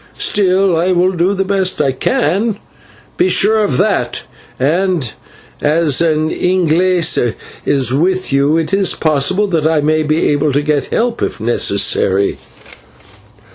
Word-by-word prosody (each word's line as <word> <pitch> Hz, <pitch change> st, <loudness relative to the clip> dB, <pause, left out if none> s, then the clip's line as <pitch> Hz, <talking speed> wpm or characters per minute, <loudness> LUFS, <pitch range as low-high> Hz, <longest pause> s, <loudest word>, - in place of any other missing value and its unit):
Still 190 Hz, -2 st, +1 dB
I 175 Hz, +3 st, +1 dB
will 180 Hz, +1 st, +2 dB
do 180 Hz, +2 st, 0 dB
the 195 Hz, 0 st, -1 dB
best 190 Hz, -1 st, 0 dB
I 140 Hz, -3 st, +1 dB
can, 190 Hz, -, -1 dB, 0.6 s
be 365 Hz, +2 st, +2 dB
sure 215 Hz, +2 st, +3 dB
of 140 Hz, -11 st, -1 dB
that, -, -, -1 dB, 0.4 s
and 160 Hz, -, 0 dB, 0.5 s
as 155 Hz, -1 st, +1 dB
an 155 Hz, -1 st, 0 dB
/Inglese/ 175 Hz, -7 st, +1 dB, 0.3 s
is 135 Hz, -3 st, +1 dB
with 185 Hz, +3 st, 0 dB
you, 140 Hz, +3 st, +2 dB
it 165 Hz, +3 st, -2 dB
is 195 Hz, -2 st, +1 dB
possible 155 Hz, +6 st, +1 dB
that 160 Hz, -4 st, 0 dB
I 160 Hz, -1 st, +1 dB
may 155 Hz, +1 st, +1 dB
be 155 Hz, +1 st, 0 dB
able 145 Hz, 0 st, 0 dB
to 145 Hz, +2 st, 0 dB
get 145 Hz, -2 st, 0 dB
help 235 Hz, 0 st, -2 dB
if -, -, -3 dB
necessary." 100 Hz, -3 st, 0 dB
165 Hz, 140 wpm, -14 LUFS, 145-185 Hz, 0.6 s, sure